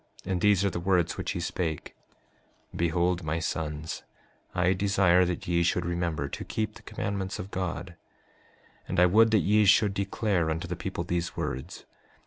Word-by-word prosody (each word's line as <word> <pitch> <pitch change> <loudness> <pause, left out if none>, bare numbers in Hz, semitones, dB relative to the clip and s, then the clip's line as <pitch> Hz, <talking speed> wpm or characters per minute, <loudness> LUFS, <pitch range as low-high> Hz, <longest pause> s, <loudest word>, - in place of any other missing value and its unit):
And 90 -1 -1
these 100 -1 +4
are 100 - +1
the 85 - -3
words 90 -1 +1
which 95 -2 -3
he - - -3
spake: 85 -2 -3 0.8
5:6 - - -7
Behold, 85 +1 +1
my 80 +1 -1
sons, 80 -1 -3 0.5
I 90 +1 +3
desire 95 -2 +3
that 90 0 -3
ye 85 0 +2
should 85 0 +1
remember 85 -4 -1
to - - -6
keep 110 -1 -3
the - - -14
commandments 100 -3 -4
of 95 - -7
God; 90 -1 -4 0.9
and - - -1
I 90 - +7
would 110 +5 +5
that 110 -3 +4
ye 105 +2 +4
should 100 0 +5
declare 100 -3 0
unto 80 +2 -2
the 90 - -3
people 85 0 -4
these 85 0 -2
words. 65 +1 -4
90 Hz, 175 wpm, -28 LUFS, 85-95 Hz, 0.9 s, I